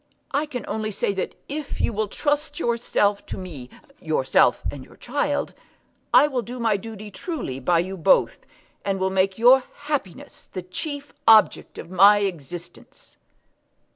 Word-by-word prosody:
I 290 +3 0
can 250 -5 -6
only 215 0 -2
say 200 -1 -1
that 190 - -4
if 295 0 -5
you - - 0
will 215 +1 -1
trust 295 - -1
yourself 230 -5 +1
to - - -5
me, 155 -10 -8 0.3
yourself 155 -5 +2
and 140 -2 -9
your - - -17
child, 285 +3 -2 0.6
I 295 - +7
will 260 -4 -1
do 245 +2 -8
my 225 -3 +2
duty 215 0 -8
truly 240 - -5
by 170 +6 +2
you 190 +2 -5
both, 185 +3 +3 0.4
and 195 -1 -1
will 190 0 0
make 190 0 +1
your 250 +3 +6 0.2
happiness 290 - -5
the 185 - -5
chief 285 - -6
object 220 -3 +5
of 170 - -9
my 200 +3 +7
existence." 175 -2 -7
205 Hz, 155 wpm, -23 LUFS, 185-255 Hz, 0.6 s, I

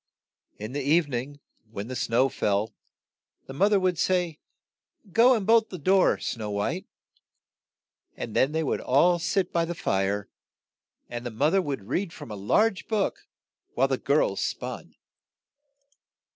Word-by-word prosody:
In 105 +3 -6
the 145 +2 -3
eve 155 +4 +3
ning, 140 +2 -5 0.3
when 100 -2 -6
the 130 - -5
snow 120 +2 +2
fell, 105 -4 -1 0.7
the 135 - -9
moth 200 +9 +2
er 200 - +5
would 185 -3 0
say, 175 -4 0 0.7
"Go 245 +6 +6
and 210 -4 -2
bolt 225 +1 +4
the 185 - -6
door, 185 +4 +3
Snow 110 -3 -4
White," 100 0 -2 1.3
and - - -6
then 135 - +3
they 160 +1 -1
would 145 - -1
all 175 +7 +3
sit 180 +2 -1
by 170 - +2
the 170 +1 -3
fire, 100 -4 -1 0.8
and 120 0 -6
the 120 - -4
moth 140 +8 +1
er 195 - +4
would 135 - -5
read 175 - -2
from - - -10
a - - -5
large 190 - +1
book, 225 - -1 0.5
while - - +3
the - - -1
girls - - +1
spun. - - -5
150 Hz, 160 wpm, -26 LUFS, 120-185 Hz, 1.3 s, Go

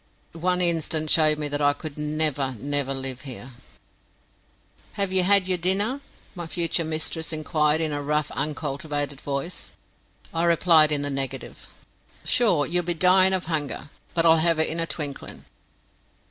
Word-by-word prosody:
One 180 +2 -1
instant 160 -2 +1
showed 155 -1 +5
me 150 -1 -2
that 145 +1 -1
I 145 0 +4
could 145 0 -8
never, 150 -3 -1
never 140 +1 -1
live 135 -1 -4
here. 130 -1 -9 1.4
"Have 200 -2 -2
ye 190 - +4
had 190 +1 +3
yer 185 -1 +1
dinner?" 200 +10 +1 0.3
my 175 -3 -6
future 170 0 0
mistress 160 +1 -3
inquired 155 0 +1
in 155 -1 -1
a 145 0 -2
rough 150 +1 -1
uncultivated 145 -1 -3
voice. 140 +5 -4 0.6
I 165 +1 0
replied 165 -2 +5
in 145 -1 +1
the 145 - -1
negative. 135 -2 -5 0.6
"Sure, 180 -12 +3
ye'll 175 +4 0
be 175 0 -3
dyin' 185 +2 +5
of 185 -1 -1
hunger; 150 -3 -4 0.2
but 165 -1 +3
I'll 165 0 +6
have 165 0 +2
it 160 - +2
in 165 - -3
a 165 - 0
twinklin'." 145 -4 -5
155 Hz, 160 wpm, -24 LUFS, 145-170 Hz, 1.4 s, I'll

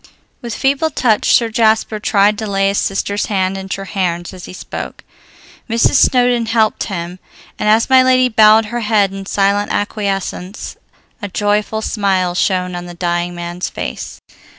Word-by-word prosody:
With 235 -2 -5
feeble 280 +4 +1
touch 230 -7 +1
Sir 230 -2 +4
Jasper 220 -1 +1
tried 205 0 +2
to 220 - -4
lay 195 -1 +1
his 200 - 0
sister's 200 +1 -2
hand 190 -2 0
in 190 0 -7
Treherne's 185 -3 -3
as 185 -1 -10
he - - -10
spoke; - - -7 0.7
Mrs. 230 +1 +2
Snowdon 245 -2 +3
helped 220 -1 +1
him, 180 -2 -5 0.4
and 210 - +1
as 220 +2 +4
my 260 -1 +6
lady 255 0 +4
bowed 220 -1 +5
her 240 - -1
head 210 -3 +1
in 195 -1 -7
silent 200 +1 +1
acquiescence, 200 -2 -3 0.5
a 205 - -3
joyful 210 +2 -1
smile 190 -5 0
shone 180 -1 0
on 175 0 -6
the 175 - -9
dying 175 0 -2
man's 175 +1 -5
face. - - -6
205 Hz, 160 wpm, -16 LUFS, 185-220 Hz, 0.7 s, my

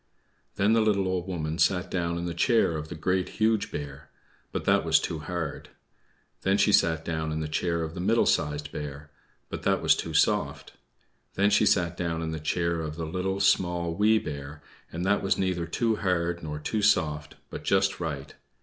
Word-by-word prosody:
Then 105 +3 +3
the 115 - +4
little 100 -3 +2
Old 95 -1 -2
Woman 80 -3 -3
sat 90 -2 +2
down 85 -2 -1
in 85 - -3
the 85 - -3
chair 110 -2 +2
of 75 0 -4
the 85 - -7
Great, 90 +3 0
Huge 110 -1 +2
Bear, 70 0 -7 0.4
but - - -4
that - - +3
was - - +4
too 80 - -4
hard. 80 -2 -5 0.7
Then 95 +1 +2
she 105 - +3
sat 80 -4 +3
down 80 -2 -2
in 80 - -2
the 80 - -2
chair 85 +2 -1
of 80 0 -5
the 90 - -7
Middle 115 +6 +2
Sized 75 -2 0
Bear, 70 0 -7 0.4
but - - -6
that - - +2
was - - +4
too - - -5
soft. - - +1 0.6
Then 100 +1 +3
she - - +4
sat 90 -2 +2
down 85 -2 -2
in 80 - -3
the 80 - -4
chair 85 +2 -1
of 75 -1 -5
the 80 0 -4
Little, 95 +4 -2
Small, 85 -3 +2
Wee 105 +5 +4
Bear, 75 -4 -6 0.3
and 85 +2 -4
that 100 +1 +2
was 95 - +1
neither 90 -3 -1
too 110 +5 0
hard 85 -3 0
nor 75 -1 -5
too 105 +8 -2
soft, 75 -7 +1 0.2
but - - -7
just 95 0 +2
right. 70 -5 -5
85 Hz, 200 wpm, -27 LUFS, 80-95 Hz, 0.7 s, the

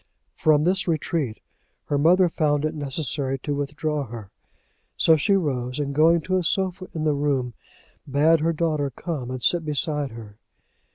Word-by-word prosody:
From 150 -1 +3
this 185 +2 +1
retreat 155 -6 -2 0.4
her 145 - 0
mother 180 +5 +5
found 150 -3 0
it 155 - -1
necessary 140 -2 -2
to 145 +2 -4
withdraw 145 0 -2
her; 110 -4 -9 0.7
so 160 - +5
she 195 +7 +2
rose, 130 -8 -1
and 140 -1 -2
going 165 +3 +4
to 185 +4 0
a 185 - 0
sofa 185 +1 -1
in 155 - -2
the 155 -1 +2
room, 140 -4 -1 0.6
bade 155 +4 +4
her 165 +2 +1
daughter 155 -3 -1
come 135 -2 -5
and 130 -1 -5
sit 175 -2 +2
beside 150 -1 -1
her. 110 -3 -11
150 Hz, 165 wpm, -24 LUFS, 135-165 Hz, 0.7 s, mother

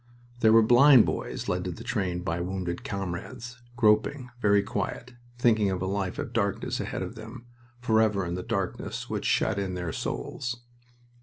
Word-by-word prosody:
There 110 -2 +5
were 115 0 +7
blind 125 +2 +7
boys - - -4
led 90 0 -1
to 90 - -2
the 100 +7 -9
train 95 -8 -2
by 85 -1 -2
wounded 90 -1 -3
comrades, 100 +6 -6
groping, 120 +4 +2
very 100 -2 +4
quiet, 105 +5 -4 0.2
thinking 110 -4 +3
of 95 -1 -1
a 95 - -2
life 95 -1 -2
of 115 - -5
darkness 100 -3 -1
ahead - - -3
of - - -6
them 115 +2 -10 0.4
forever 110 -5 +2
in 85 - -3
the 90 - -3
darkness - - -4
which - - -3
shut 100 - +1
in 95 -2 -3
their 90 -2 -3
souls. 120 -2 -4
105 Hz, 170 wpm, -27 LUFS, 95-120 Hz, 0.4 s, were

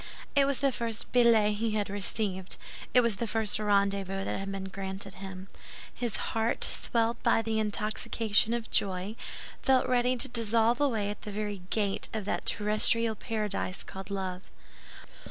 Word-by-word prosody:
It 280 -1 +5
was 275 -1 0
the 275 -1 +3
first 230 -2 -3
billet 225 -4 +4
he 220 0 -1
had 205 -1 0
received; 195 -1 -2 0.3
it 250 - +6
was 235 -4 +1
the 235 - -2
first 220 -1 +1
rendezvous 200 -2 +1
that - - -2
had 195 0 -4
been 195 -1 -4
granted 190 0 -5
him. 190 0 -8 0.5
His 240 -4 -2 0.2
heart, 225 +1 0
swelled 230 0 +1
by 225 - +3
the 220 0 0
intoxication 215 +1 +2
of 235 -1 -5
joy, 190 +2 0 0.5
felt 260 -1 +3
ready 250 0 +2
to 240 - +3
dissolve 230 +1 +2
away 220 -8 +1
at 205 - -8
the 210 - -6
very 205 -1 -4
gate 205 -3 0
of 215 -3 -3
that - - -2
terrestrial 215 +2 +3
paradise 210 -4 -3
called 190 +1 -9
Love! 190 -2 -3
215 Hz, 160 wpm, -29 LUFS, 195-230 Hz, 0.5 s, it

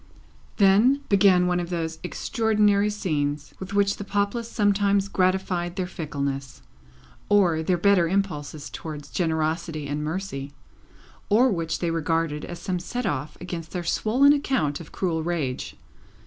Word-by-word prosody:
Then, 215 +8 +5
began 190 -3 +5
one 180 0 +1
of 175 -1 -4
those 165 -2 -3
extraordinary 210 +1 +1
scenes 150 -8 -2
with 190 +1 -6
which 200 0 +2
the - - -5
populace 205 +4 -1
sometimes 200 -2 +2
gratified 185 -2 0
their 185 -2 -1
fickleness, 140 -6 -4 0.7
or 180 -6 +4
their 175 +2 +1
better 185 -1 +4
impulses 160 -6 -2
towards 150 -2 -7
generosity 160 -2 -1
and 145 +1 -3
mercy, 150 -4 -4 0.8
or 240 +5 +5
which 165 -3 -1
they 170 -2 0
regarded 165 -2 -1
as 175 - -7
some 185 -1 -3
set 245 +8 -4
off 145 +2 -3
against 170 -2 -6
their 180 -2 -3
swollen 255 +11 +4
account 260 - 0
of 160 - -11
cruel 170 -4 -1
rage. 155 -6 -3
180 Hz, 140 wpm, -25 LUFS, 160-200 Hz, 0.8 s, Then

